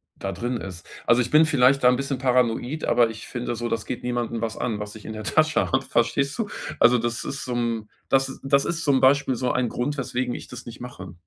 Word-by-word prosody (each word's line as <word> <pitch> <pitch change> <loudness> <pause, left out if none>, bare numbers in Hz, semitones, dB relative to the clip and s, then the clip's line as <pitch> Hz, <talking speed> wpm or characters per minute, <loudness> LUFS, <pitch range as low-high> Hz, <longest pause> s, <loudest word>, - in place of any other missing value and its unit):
da - - -4
drin 120 +1 -3
ist. 90 -5 -8 0.2
Also, 120 +2 +5
ich 125 - -3
bin 155 +1 +7
vielleicht 135 -2 +4
da 125 - +8
'n 125 - +4
bisschen 135 0 -2
paranoid, 125 +3 +1
aber 120 -2 +4
ich 110 -1 -9
finde 120 -1 -3
so, 120 +1 -2
das 115 - -2
geht 125 - -5
niemanden 120 -1 -2
was 110 -1 -3
an, 115 -4 -2
was 105 0 -6
ich 110 - -11
in - - -5
der 110 0 -6
Tasche 155 +7 +2
habe, 130 - +3
verstehst 140 +3 0
du? 225 - 0 0.3
Also, 120 +1 +6
das 120 +1 -2
ist 140 - -4
so 125 - -4
'n 115 -3 -2 0.2
das 135 0 +1
das 140 0 +3
ist 165 -1 -2
zum 140 -3 +3
Beispiel 135 0 +4
so 125 +1 0
ein 125 -1 +1
Grund, 135 +6 -2
weswegen 125 -1 -2
ich - - -8
das 125 0 -9
nicht 115 - -9
mache. 120 -7 -9
125 Hz, 245 wpm, -24 LUFS, 115-135 Hz, 0.3 s, da